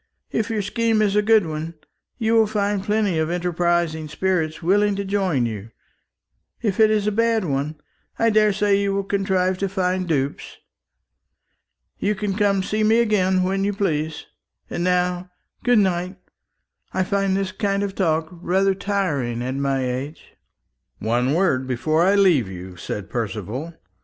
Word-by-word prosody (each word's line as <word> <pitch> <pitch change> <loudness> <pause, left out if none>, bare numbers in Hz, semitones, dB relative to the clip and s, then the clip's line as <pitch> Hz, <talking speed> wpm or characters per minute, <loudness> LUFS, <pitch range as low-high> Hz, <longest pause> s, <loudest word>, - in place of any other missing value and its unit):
If 220 0 -1
your 215 -2 -1
scheme 225 +2 +1
is 205 -1 +1
a 210 - +4
good 215 -2 +4
one, 160 +1 -5 0.4
you 225 -2 +1
will 225 -1 +5
find 205 -2 -1
plenty 205 -5 +1
of 160 0 0
enterprising 175 -2 0
spirits 165 -1 -1
willing 205 +3 +3
to 200 0 -3
join 190 -10 +1
you; 110 -1 -5 0.9
if 210 -4 -2
it 220 -1 +6
is 215 -1 +1
a 210 - +1
bad 225 -1 +1
one, 145 +1 -2 0.4
I 230 0 +3
daresay 210 -1 +3
you 200 -1 0
will 200 - 0
contrive 190 -2 0
to 195 - -1
find 185 -1 -1
dupes. 140 -4 -2 1.4
You 210 +1 0
can 205 -1 -2
come 205 -1 +2
and 190 -1 -1
see 215 +2 0
me 220 +2 +4
again 190 -5 +2
when 195 +1 0
you 205 +1 0
please. 160 -6 -2 0.5
And 175 - -2
now 180 0 0 0.3
good 245 -1 +4
night. 185 -1 0 0.8
I 190 - +2
find 195 0 0
this 195 -1 -2
kind 200 -1 -1
of 200 -1 -3
talk 160 -4 0
rather 185 +3 +1
tiring 160 - -1
at 130 +1 -2
my 135 -1 0
age." 130 +5 -5 0.6
"One 120 +6 0
word 140 -8 +1
before 155 +6 0
I 190 +3 +4
leave 175 - +4
you," 90 0 -8
said 95 +3 -5
Percival. 115 - -4
185 Hz, 160 wpm, -22 LUFS, 155-205 Hz, 1.4 s, it